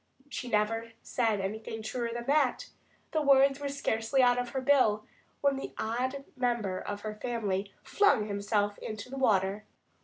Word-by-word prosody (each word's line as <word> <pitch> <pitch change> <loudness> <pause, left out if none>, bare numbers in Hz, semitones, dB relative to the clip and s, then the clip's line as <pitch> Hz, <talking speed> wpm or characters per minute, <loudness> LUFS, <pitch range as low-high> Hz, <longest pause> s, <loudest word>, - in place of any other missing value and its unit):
She 250 -3 -5
never 225 +1 0
said 225 -4 0
anything 220 +3 -4
truer 235 +1 -2
than 235 0 -5
that. 280 -1 +2 0.4
The 315 - +1
words 275 -1 +5
were 285 -1 -3
scarcely 260 -2 +1
out 245 0 +4
of 245 0 -2
her 270 - -2
bill 255 -6 +3 0.4
when 280 -1 +2
the 270 - -6
odd 255 +5 -2
member 235 -7 0
of 205 0 -5
her 215 0 -4
family 210 -4 -2
flung 405 - +3
himself 205 0 0
into 215 +3 -6
the 270 - -5
water. 200 -4 +2
230 Hz, 160 wpm, -30 LUFS, 210-265 Hz, 0.4 s, words